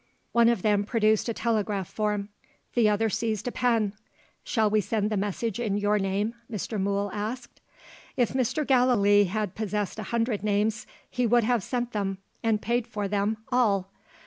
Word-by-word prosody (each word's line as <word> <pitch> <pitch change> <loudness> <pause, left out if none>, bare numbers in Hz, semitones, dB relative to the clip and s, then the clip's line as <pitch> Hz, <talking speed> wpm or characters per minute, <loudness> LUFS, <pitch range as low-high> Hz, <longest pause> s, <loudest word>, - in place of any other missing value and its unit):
One 235 0 +5
of 235 -6 0
them 205 -1 +3
produced 215 0 +2
a - - 0
telegraph 210 -5 -1
form; 210 -1 -2 0.4
the 230 -3 +4
other 210 +2 +2
seized 220 0 -2
a - - -1
pen. 230 -5 +1 0.5
"Shall 220 -2 +1
we 210 0 +2
send 210 +1 -1
the - - +1
message 205 +2 -2
in 210 -4 0
your 205 0 +2
name?" 200 +3 -1 0.2
Mr. 210 0 -3
Mool 200 0 0
asked. 220 +4 -5 0.6
If 245 -3 +2
Mr. 260 +4 0
Gallilee 235 -6 +4
had 205 0 -2
possessed 210 -1 -3
a - - -3
hundred 230 -3 0
names 215 +3 0 0.2
he 250 -1 0
would 240 +1 +4
have 240 0 +2
sent 245 +2 -3
them 195 -3 -2 0.2
(and 225 -2 +1
paid 240 0 0
for 205 -1 -3
them) 205 +2 0
all. 200 -6 +2
215 Hz, 170 wpm, -27 LUFS, 205-235 Hz, 0.6 s, One